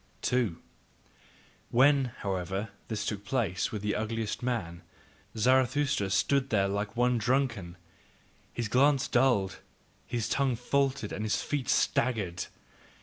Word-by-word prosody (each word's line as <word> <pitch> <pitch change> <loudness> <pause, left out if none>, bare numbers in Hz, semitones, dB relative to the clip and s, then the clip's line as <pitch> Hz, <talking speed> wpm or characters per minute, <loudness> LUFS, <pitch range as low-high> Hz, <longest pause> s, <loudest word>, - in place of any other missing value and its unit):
2. 120 -9 +1 1.1
When, 135 +2 +5 0.2
however, 95 +2 -2 0.2
this 105 -2 -3
took 105 -2 -3
place 105 -5 -1
with 105 -2 -5
the 105 - 0
ugliest 110 0 -2
man, 95 -9 -3 0.6
Zarathustra 130 -2 +2
stood 135 +8 +2
there 100 -3 +2
like 100 +3 -3
one 125 0 +3
drunken: 115 -8 0 0.7
his 120 -2 -3
glance 135 +4 +3
dulled, 120 -7 +2 0.5
his 115 -2 -2
tongue 135 -3 +1
faltered 135 -1 0
and 105 - -4
his 110 - 0
feet 145 -4 -2
staggered. 100 -8 +1
115 Hz, 120 wpm, -29 LUFS, 100-130 Hz, 1.1 s, When